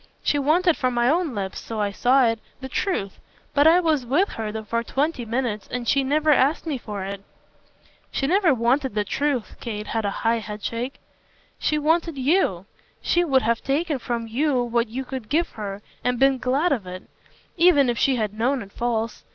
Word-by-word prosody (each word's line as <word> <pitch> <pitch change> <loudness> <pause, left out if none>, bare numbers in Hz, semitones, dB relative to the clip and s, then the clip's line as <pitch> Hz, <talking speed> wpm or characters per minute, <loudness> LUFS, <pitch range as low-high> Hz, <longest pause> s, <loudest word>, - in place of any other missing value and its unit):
She 290 - +2
wanted 325 +4 +3
from 255 -2 0
my 240 0 +2
own 320 -2 +1
lips 195 -2 -4
so 225 -1 -6
I 205 -1 0
saw 250 +5 +3
it 230 -1 +1 0.2
the 265 - -6
truth. 260 - -2 0.3
But 285 +2 +5
I 335 +2 +7
was 315 -6 +1
with 295 - +2
her 220 -2 -4
for 230 +2 -1
twenty 270 +1 -1
minutes, 230 -2 -2
and 245 -1 -4
she 275 -1 +3
never 305 +3 +2
asked 285 +3 +3
me 295 -5 -2
for 205 -4 -6
it." 200 0 -6 0.9
"She 270 - -1
never 365 +2 +3
wanted 255 0 +1
the 210 - +1
truth" 265 +3 -2
Kate 210 -2 -5
had 225 0 -2
a 200 - 0 0.2
high 230 0 +3
headshake. 225 +4 -5 0.6
"She 305 - +1
wanted 320 +1 +1
YOU. 260 - +1 0.3
She 350 - +2
would 270 -6 +2
have 230 0 +1
taken 290 +1 -1
from 235 -1 -3
you 255 +2 +1
what 235 0 0
you 260 +4 -5
could 250 -4 -6
give 335 +3 +1
her 205 -1 -7 0.2
and 250 0 +1
been 270 +1 +3
glad 275 +8 +1
of 225 -9 -1
it, 185 0 -7 0.5
even 335 -6 +5
if 240 -1 0
she 270 - +3
had 215 -4 -1
known 245 +3 0
it 200 - -14
false. 230 -1 -2
255 Hz, 195 wpm, -23 LUFS, 225-295 Hz, 0.9 s, I